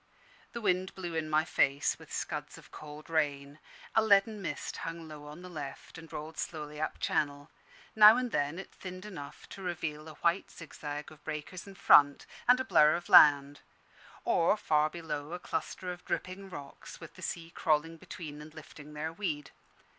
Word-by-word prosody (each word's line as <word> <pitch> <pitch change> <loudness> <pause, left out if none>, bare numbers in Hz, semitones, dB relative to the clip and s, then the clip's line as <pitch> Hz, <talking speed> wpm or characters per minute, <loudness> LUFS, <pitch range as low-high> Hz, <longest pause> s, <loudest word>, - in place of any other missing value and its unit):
The 235 - -5
wind 185 -2 0
blew 175 -3 -5
in 160 -1 -2
my 155 +1 +3
face, 140 -3 +1
with - - -14
scuds - - -4
of - - -16
cold 150 0 -10
rain; 145 -2 -1 0.3
a 220 - +5
leaden 210 0 +4
mist 145 -6 -4
hung 165 0 -6
low 150 -1 -10
on 150 +4 -10
the - - -8
left, 145 -5 -8
and 165 -2 -11
rolled 155 +1 -7
slowly 150 -2 -5
up 155 - -3
Channel. 145 -1 -1 0.4
Now 215 +1 +9
and 250 -1 -1
then 145 +1 0
it 195 - -9
thinned 185 0 -8
enough 145 -9 -9
to 195 - -9
reveal 160 -4 -4
a 155 - -10
white 170 +5 +1
zigzag 150 -3 -7
of 155 - -16
breakers 155 +5 -6
in 195 - -11
front, 145 -6 +6 0.2
and 250 +1 +6
a 260 - -1
blur 150 -11 +5
of 175 0 -6
land; 145 -1 +7 0.7
or, 170 +5 +3
far 155 -5 +2
below, 155 -2 -5
a 180 - -4
cluster 180 0 -4
of 175 0 -9
dripping 190 +1 -4
rocks, 145 -6 -10
with - - -11
the - - -14
sea 165 -1 -4
crawling 165 0 0
between 160 -4 -8
and 155 +1 -12
lifting 150 -1 -12
their 160 +2 -3
weed. 160 -7 -3
160 Hz, 185 wpm, -31 LUFS, 150-180 Hz, 0.7 s, Now